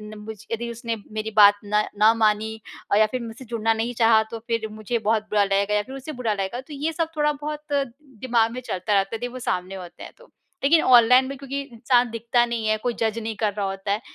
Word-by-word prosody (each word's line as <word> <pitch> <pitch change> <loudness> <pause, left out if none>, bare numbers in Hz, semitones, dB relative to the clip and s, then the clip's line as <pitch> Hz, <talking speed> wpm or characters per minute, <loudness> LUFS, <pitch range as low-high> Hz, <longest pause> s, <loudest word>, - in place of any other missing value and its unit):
नम 210 0 -11 0.2
यदि 235 +1 -3
उसने 230 0 -4 0.2
मेरी 215 0 -4
बात 205 -1 +8
न 210 +1 +2 0.2
ना 215 +1 +6
मानी 220 0 +1 0.3
अ, - - +4
या 215 - +6
फिर 255 - -2
मुझसे 230 +3 -9
जुड़ना 225 -1 0
नहीं 225 +2 -2
चाहा, 225 -1 +6
तो 230 - -5
फिर 230 -2 -1
मुझे 215 +2 -3
बहुत 220 -1 +2
बुरा 210 -1 +3
लगेगा 200 +1 +1
या 210 - +2
फिर 265 +5 -10
उसे 270 +3 -7
बुरा 225 -3 +1
लगेगा 200 +5 -3
तो 295 +3 -12
ये 295 +3 -2
सब 325 0 -1
थोड़ा-बहुत 300 0 -2
दिमाग़ 255 -4 -1
में 250 +2 -6
चलता 205 -4 -2
रहता 195 +2 +1
है - - -2
यदि 245 +2 -4
वो 255 - -6
सामने 185 -5 -3
होते 180 -2 -10
हैं - - -9
तो। - - -20 0.3
लेकिन 315 +4 +5
ऑनलाइन 250 +1 +6
में 275 +1 -6
क्योंकि 275 +1 -5
इंसान 245 -1 +1
दिखता 235 +1 +1
नहीं 235 -2 -3
है, 215 0 +2
कोई 240 +3 -2
जज 225 -1 0
नहीं 225 0 -4
कर 215 -2 0
रहा 200 0 -2
होता 195 +1 -3
है 205 +2 0
230 Hz, 240 wpm, -24 LUFS, 215-255 Hz, 0.3 s, बात